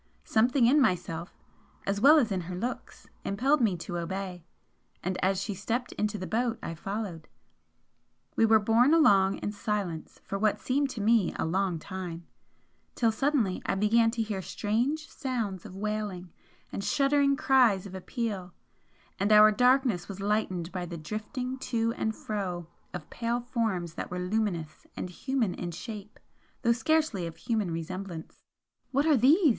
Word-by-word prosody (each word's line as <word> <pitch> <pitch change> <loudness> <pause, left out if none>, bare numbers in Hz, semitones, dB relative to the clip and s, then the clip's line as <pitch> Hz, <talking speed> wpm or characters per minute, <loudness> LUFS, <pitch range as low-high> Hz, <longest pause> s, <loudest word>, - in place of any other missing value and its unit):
Something 245 +3 +3
in 285 +5 +5
myself, 175 -6 -1 0.5
as 200 +1 -1
well 295 +4 +8
as 240 -8 +2
in 190 -2 0
her 180 +1 -6
looks, 240 +8 -5 0.2
impelled 265 +9 +2
me 205 -6 +2
to 175 +1 -4
obey, 180 0 -4 0.6
and 185 +1 -1
as 190 0 +2
she 205 +2 -3
stepped 225 +6 -2
into 210 0 -1
the 185 - -5
boat 230 +3 0
I 165 - -4
followed. 195 -1 -5 1.1
We - - +3
were 220 0 +7
borne 230 +8 +4
along 195 -11 +5
in 205 - -3
silence 205 -6 -3
for 195 - -4
what 215 0 +2
seemed 275 +2 0
to 235 -5 -5
me 220 -3 +3
a - - -1
long 185 +1 0
time, 175 -1 -6 0.7
till 230 -2 +3
suddenly 235 -5 +1
I - - +1
began 225 +3 +4
to 225 0 -1
hear 210 -3 -3
strange 245 - -1
sounds 230 - -3
of 185 - -11
wailing, 205 -3 -3 0.4
and 200 - -4
shuddering 280 +2 +3
cries 245 -9 +4
of 195 - -9
appeal, 190 -2 -4 0.6
and 200 +2 +1
our 215 0 +8
darkness 250 -3 +3
was 195 -1 -7
lightened 195 -4 -1
by 180 -2 -4
the 170 0 -6
drifting 250 - -4
to 230 -3 0
and 220 -2 -2
fro 185 -5 -4 0.3
of 165 -4 -7
pale 235 +1 -1
forms 220 -9 -2
that - - -5
were 180 - -4
luminous 180 -4 -2
and 180 - -4
human 245 -1 -1
in 175 - -5
shape 210 +4 -8 0.4
though 235 - +4
scarcely 240 - +1
of 165 - -9
human 220 -6 -1
resemblance. 170 +1 -6 0.5
"What 280 +2 +1
are 310 -2 +5
these?" 295 - +5
210 Hz, 160 wpm, -29 LUFS, 185-240 Hz, 1.1 s, well